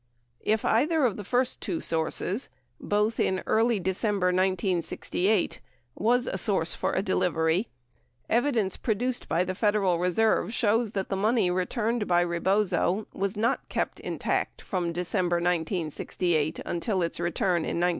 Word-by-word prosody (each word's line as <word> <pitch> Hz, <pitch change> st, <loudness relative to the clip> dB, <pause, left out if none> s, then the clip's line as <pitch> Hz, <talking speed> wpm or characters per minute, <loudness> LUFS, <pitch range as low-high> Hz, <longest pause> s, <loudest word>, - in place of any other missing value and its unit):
If 215 Hz, 0 st, 0 dB
either 295 Hz, +5 st, +3 dB
of 225 Hz, -6 st, +1 dB
the 205 Hz, -, -6 dB
first 250 Hz, +5 st, 0 dB
two 180 Hz, -6 st, -2 dB
sources 165 Hz, -, -1 dB, 0.2 s
— 120 Hz, 0 st, -44 dB
both 210 Hz, +2 st, 0 dB
in 190 Hz, 0 st, +1 dB
early 225 Hz, 0 st, +2 dB
December 190 Hz, +1 st, 0 dB
1968 185 Hz, +1 st, 0 dB, 0.2 s
— 120 Hz, 0 st, -43 dB
was 245 Hz, +4 st, +2 dB
a 190 Hz, -, -2 dB
source 180 Hz, -5 st, +2 dB
for -, -, -2 dB
a 190 Hz, -, 0 dB
delivery, 175 Hz, 0 st, +1 dB, 0.6 s
evidence 230 Hz, -5 st, +1 dB
produced 245 Hz, +3 st, -1 dB
by 170 Hz, +3 st, +2 dB
the 185 Hz, 0 st, -3 dB
Federal 200 Hz, -3 st, +1 dB
Reserve 200 Hz, +3 st, +1 dB
shows 225 Hz, 0 st, +1 dB
that 195 Hz, -1 st, -2 dB
the 195 Hz, -, -1 dB
money 210 Hz, -1 st, +2 dB
returned 215 Hz, +5 st, -1 dB
by 175 Hz, 0 st, +3 dB
Rebozo 190 Hz, +3 st, +1 dB
was 200 Hz, +1 st, -2 dB
not 225 Hz, +2 st, 0 dB
kept -, -, -2 dB
intact -, -, -2 dB
from 180 Hz, -4 st, -2 dB
December 175 Hz, 0 st, -1 dB
1968 170 Hz, -2 st, -1 dB
until 185 Hz, +2 st, -1 dB
its 170 Hz, -, -3 dB
return 175 Hz, +1 st, 0 dB
in 165 Hz, -, -2 dB
1973. 175 Hz, +1 st, +3 dB
190 Hz, 150 wpm, -27 LUFS, 175-220 Hz, 0.6 s, either